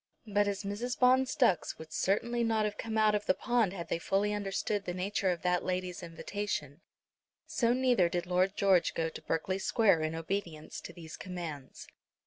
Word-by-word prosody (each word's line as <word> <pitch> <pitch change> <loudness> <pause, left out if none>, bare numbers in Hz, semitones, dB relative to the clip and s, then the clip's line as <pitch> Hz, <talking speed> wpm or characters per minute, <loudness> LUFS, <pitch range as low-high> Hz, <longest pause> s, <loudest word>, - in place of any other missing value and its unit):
But 205 -1 +2
as 200 0 -2
Mrs. 210 +5 -3
Bond's 260 +1 +4
ducks 245 - +2
would 160 -1 -10
certainly 235 +8 +1
not 220 -2 +2
have 210 -1 -2
come 220 -1 -3
out 215 -1 +4
of 210 0 -1
the 185 - +4
pond 240 -6 +1
had 170 -3 -6
they - - 0
fully 200 +4 +1
understood 205 0 -2
the 175 - -3
nature 190 +1 0
of 175 -2 -2
that 180 -1 +1
lady's 180 -1 -2
invitation, 170 -3 -4 0.6
so 235 -2 +1
neither 245 -8 +3
did 175 0 -2
Lord 185 +2 +1
George 190 -3 +3
go 165 0 0
to - - -9
Berkeley 185 +4 -1
Square 195 -5 +3
in 155 +1 -1
obedience 165 -2 -4
to - - -8
these 165 -2 -10
commands. 165 -7 -7
195 Hz, 185 wpm, -31 LUFS, 170-210 Hz, 0.6 s, Bond's